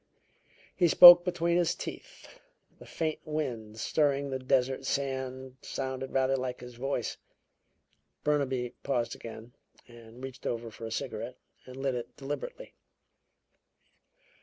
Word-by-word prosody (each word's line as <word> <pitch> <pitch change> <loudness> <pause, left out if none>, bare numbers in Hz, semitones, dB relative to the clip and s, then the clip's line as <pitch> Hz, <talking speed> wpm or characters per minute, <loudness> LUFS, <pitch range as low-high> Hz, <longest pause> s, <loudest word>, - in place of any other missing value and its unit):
He 175 - +4
spoke 175 +1 +11
between 170 -1 0
his 175 -2 +1
teeth - - -10 0.4
the - - -13
faint 160 -2 -2
wind 120 -9 -4
stirring 140 +1 +1
the 130 - -2
desert 130 0 +1
sand 130 -1 -3
sounded 130 0 -4
rather 135 0 +2
like 125 -1 -3
his 125 0 -10
voice." 125 -1 -3 1.1
Burnaby 130 -5 0
paused 120 -4 -1
again 115 +1 -10 0.3
and 120 +1 -14
reached 135 -1 -7
over 115 -1 -3
for 115 +1 -8
a - - -8
cigarette - - -4 0.3
and 130 0 -10
lit 135 -1 -1
it 120 -1 -6
deliberately. 150 - -6
130 Hz, 125 wpm, -29 LUFS, 125-145 Hz, 1.1 s, spoke